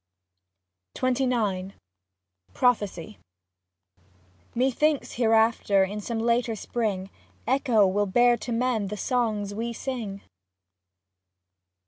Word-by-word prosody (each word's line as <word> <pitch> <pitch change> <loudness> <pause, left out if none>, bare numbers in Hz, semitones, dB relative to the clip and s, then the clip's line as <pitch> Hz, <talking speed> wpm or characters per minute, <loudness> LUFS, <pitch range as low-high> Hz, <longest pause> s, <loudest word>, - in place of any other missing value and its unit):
XXIX 235 -7 0 0.8
PROPHESY 195 - 0 1.4
Methinks 270 +4 +1
hereafter 225 -4 +3
in 205 +2 -3
some 230 +2 -4
later 235 0 +1
spring 205 -4 -3 0.3
Echo 245 -4 +3
will 205 +2 +1
bear 240 +5 +4
to 240 +1 -7
men 230 -3 0
the 210 +2 -5
songs 215 -5 -1
we 230 +3 -3
sing. 225 -6 -5
225 Hz, 85 wpm, -26 LUFS, 205-245 Hz, 1.4 s, bear